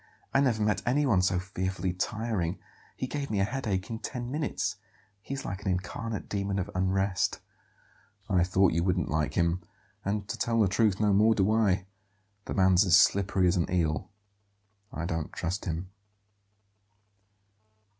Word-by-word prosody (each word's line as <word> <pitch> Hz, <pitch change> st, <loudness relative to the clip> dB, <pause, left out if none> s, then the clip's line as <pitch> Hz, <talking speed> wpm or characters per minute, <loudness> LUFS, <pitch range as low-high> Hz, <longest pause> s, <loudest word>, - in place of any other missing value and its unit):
I 135 Hz, -, +4 dB
never 115 Hz, -6 st, +2 dB
met 105 Hz, -1 st, +1 dB
anyone 125 Hz, -6 st, +2 dB
so 90 Hz, 0 st, +2 dB
fearfully 95 Hz, 0 st, -2 dB
tiring. 105 Hz, -3 st, -2 dB, 0.4 s
He -, -, -3 dB
gave 140 Hz, +1 st, -4 dB
me 105 Hz, -, 0 dB
a -, -, +3 dB
headache 105 Hz, -4 st, -2 dB
in 110 Hz, -, -4 dB
ten 120 Hz, 0 st, -5 dB
minutes. 150 Hz, +2 st, -2 dB, 0.4 s
He 135 Hz, -, -5 dB
is 135 Hz, -, -6 dB
like 95 Hz, +1 st, -4 dB
an -, -, -6 dB
incarnate 100 Hz, +4 st, -3 dB
demon 100 Hz, -1 st, -2 dB
of 95 Hz, -, -3 dB
unrest." 95 Hz, +1 st, 0 dB, 0.9 s
"I 90 Hz, -4 st, +3 dB
thought 95 Hz, 0 st, +3 dB
you 85 Hz, +1 st, +1 dB
wouldn't 90 Hz, -5 st, 0 dB
like 75 Hz, -1 st, 0 dB
him; 85 Hz, +1 st, +1 dB, 0.4 s
and, 100 Hz, 0 st, -2 dB
to 95 Hz, -, -5 dB
tell 115 Hz, -1 st, +1 dB
the 105 Hz, -, +5 dB
truth, 100 Hz, +1 st, +2 dB
no 105 Hz, -2 st, +3 dB
more 110 Hz, +3 st, +5 dB
do 100 Hz, +1 st, +2 dB
I. 100 Hz, -4 st, +2 dB, 0.6 s
The -, -, -4 dB
man's 95 Hz, -1 st, +5 dB
as 90 Hz, -3 st, +6 dB
slippery 95 Hz, -1 st, +3 dB
as 90 Hz, -, +2 dB
an 85 Hz, -, 0 dB
eel; 80 Hz, -4 st, 0 dB, 0.8 s
I 85 Hz, -, -4 dB
don't 80 Hz, -2 st, -3 dB
trust 90 Hz, +5 st, -3 dB
him." 90 Hz, +1 st, -4 dB
95 Hz, 165 wpm, -29 LUFS, 90-110 Hz, 0.9 s, as